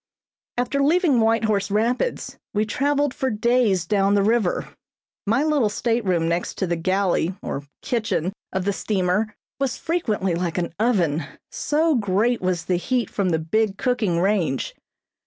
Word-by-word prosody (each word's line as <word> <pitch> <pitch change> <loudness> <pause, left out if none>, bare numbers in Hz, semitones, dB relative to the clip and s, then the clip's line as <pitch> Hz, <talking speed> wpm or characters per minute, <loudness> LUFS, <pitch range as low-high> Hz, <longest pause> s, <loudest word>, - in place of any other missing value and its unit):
After 250 +3 0
leaving 305 -2 +3
White 225 0 +3
Horse 210 -2 +1
Rapids 235 - -1 0.2
we 210 +1 +2
traveled 285 +4 0
for 265 - -1
days 220 -5 +2
down 200 +2 +2
the 200 - +3
river. 215 -3 +1 0.6
My 230 +7 +2
little 295 -8 +2
stateroom 205 -7 0
next 170 +1 -2
the 175 -3 0
galley 185 0 0
or 140 +1 -4 0.2
kitchen 215 - -1 0.2
of 190 -1 -2
the 200 - +1
steamer 200 +2 0 0.2
was 270 -3 -1
frequently 220 - -1
like 170 0 -2
an 170 -2 -2
oven, 175 -10 +1 0.3
so 315 +2 +1
great 225 +1 +1
was 185 -2 -1
the 180 - +1
heat 240 +4 -1
from 195 -3 0
the 165 - +2
big 195 +6 0
cooking 220 -9 0
range. 175 - 0
210 Hz, 150 wpm, -23 LUFS, 180-245 Hz, 0.6 s, leaving